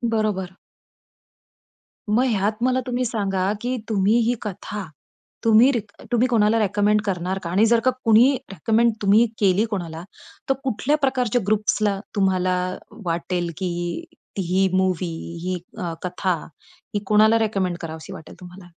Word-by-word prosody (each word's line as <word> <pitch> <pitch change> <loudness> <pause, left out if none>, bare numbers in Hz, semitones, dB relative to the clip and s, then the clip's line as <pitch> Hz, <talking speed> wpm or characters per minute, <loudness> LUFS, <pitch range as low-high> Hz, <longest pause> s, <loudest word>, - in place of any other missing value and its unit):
बरोबर. 190 -4 -1 1.5
मग 235 +5 +3
ह्यात 215 -2 0
मला 255 0 +2
तुम्ही 250 0 -1
सांगा, 195 -4 -1
की 250 +1 -2
तुम्ही 210 +2 +3
ही 245 - +3
कथा, 210 0 -5 0.6
तुम्ही 230 +4 +6
रि 240 - 0 0.3
तुम्ही 240 +2 +3
कोणाला 225 -1 +3
रिकमेंड 210 +1 +2
करणार 185 0 -2
का 170 - -4
आणि 200 +5 +3
जर 230 0 +4
का 255 - +5
कोणी 230 +3 +6 0.2
रिकमेंड 225 +6 +2
तुम्ही 205 +4 +5
केली 200 +2 +3
कोणाला, 170 -4 -4 0.5
तर - - +5
कुठल्या 265 +4 0
प्रकारच्या 250 -4 +1
ग्रुप्सला 210 -1 +1 0.2
तुम्हाला 185 -2 +2 0.5
वाटेल 170 +1 -2
की 185 - -2 0.7
ही 190 - 0
ही 190 +2 +2
मूव्ही 185 -2 +1 0.4
ही 185 0 -1 0.2
अ, 170 -2 -3
कथा 180 0 -1 0.6
ही - - +2
कोणाला 215 +2 +5
रिकमेंड 195 -5 0
करावीशी 160 -1 -7
वाटेल 160 - -11
तुम्हाला? 180 0 -12
205 Hz, 140 wpm, -22 LUFS, 185-225 Hz, 1.5 s, तुम्ही